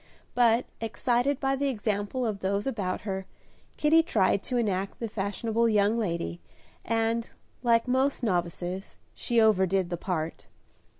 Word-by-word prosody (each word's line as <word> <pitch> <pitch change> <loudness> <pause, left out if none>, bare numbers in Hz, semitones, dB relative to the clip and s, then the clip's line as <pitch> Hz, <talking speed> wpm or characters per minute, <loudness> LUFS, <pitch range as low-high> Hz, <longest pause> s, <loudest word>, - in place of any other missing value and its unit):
But, 240 0 +4
excited 245 +4 0
by 270 -1 +1
the 280 +1 0
example 215 0 -1
of 210 -3 -2
those 200 +1 -1
about 200 -8 -2
her, 190 -2 -4 0.5
Kitty 315 +2 +5
tried 200 - +2
to 250 - -1
enact 195 -4 -1
the 230 - -2
fashionable 220 +3 0
young 210 0 +3
lady, 175 -5 -2 0.4
and, 225 +1 0 0.3
like 235 -1 +3
most 260 +2 +1
novices, 180 -1 -2 0.2
she 235 -1 0
overdid 190 -4 +3
the 175 - -1
part. 165 -3 -3
220 Hz, 135 wpm, -28 LUFS, 190-240 Hz, 0.5 s, Kitty